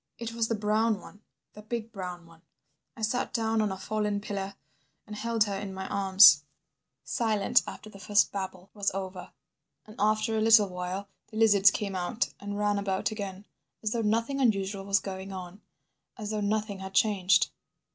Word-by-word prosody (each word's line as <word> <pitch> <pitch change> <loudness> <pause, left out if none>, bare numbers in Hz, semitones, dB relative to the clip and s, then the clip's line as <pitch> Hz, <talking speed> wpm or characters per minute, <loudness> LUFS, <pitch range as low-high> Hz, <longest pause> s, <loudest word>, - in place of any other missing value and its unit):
"It 230 -1 -5
was 230 -1 0
the 230 - 0
brown 215 +1 +1
one, 205 +3 -14 0.3
the 210 - -11
big 225 +1 -5
brown 180 -4 -7
one. 165 -1 -19 0.6
I 225 - -7
sat 235 +3 0
down 225 -2 +1
on 210 -2 0
a 190 - -4
fallen 210 +1 -1
pillar 200 -1 -5 0.5
and 210 - -8
held 230 0 +1
her 205 -2 -3
in 195 -1 -5
my 190 0 -5
arms... 190 -6 +7 0.6
Silent 215 -4 +2
after - - -8
the 200 -2 -12
first 205 +2 +3
babble 190 -1 -6
was 205 -1 0
over. 190 -1 -5 0.6
And 215 -1 -13
after 215 +2 +1
a 220 - +1
little 220 -2 +6
while 180 +2 -4 0.2
the 215 - -9
lizards 205 -3 +6
came 200 -1 -3
out 185 +6 -2
and 205 0 -5
ran 205 -1 +1
about 195 +1 -1
again, 200 -2 -6 0.4
as 215 - -1
though 235 - 0
nothing 230 +6 0
unusual 195 -4 0
was 200 0 +3
going 190 0 -6
on, 185 +1 -8 0.6
as 215 -2 -5
though 215 -1 -2
nothing 205 -1 -1
had 190 0 -8
changed 195 -3 +3
205 Hz, 180 wpm, -28 LUFS, 190-215 Hz, 0.6 s, arms